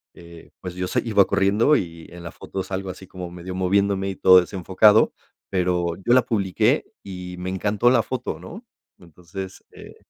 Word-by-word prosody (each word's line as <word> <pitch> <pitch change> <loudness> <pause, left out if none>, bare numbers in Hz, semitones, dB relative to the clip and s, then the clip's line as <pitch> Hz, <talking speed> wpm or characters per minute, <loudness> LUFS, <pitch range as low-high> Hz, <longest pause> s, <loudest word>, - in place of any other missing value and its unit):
eh, 85 -1 -14
pues 90 -1 -7
yo 90 0 -3
se 125 - 0
iba 105 -4 +4
corriendo 100 +8 +3
y 85 - -4
en 85 0 -11
la 85 - -7
foto 95 - -6
salgo 95 0 -5
así 95 +1 -9
como 90 -1 -8
medio 90 +1 -8
moviéndome 100 +1 +1
y 95 - -5
todo 95 0 +7
desenfocado, 95 +4 +3 0.4
pero 90 -2 0
yo 120 - +4
la 130 - +6
publiqué 110 - +1 0.2
y 90 -2 -8
me 90 +1 -4
encantó 105 +5 +1
la 120 -3 +3
foto, 130 -1 -4
¿no? 215 +8 -11 0.3
Entonces, 90 +3 -10
eh, - - -13
95 Hz, 180 wpm, -23 LUFS, 90-105 Hz, 0.4 s, todo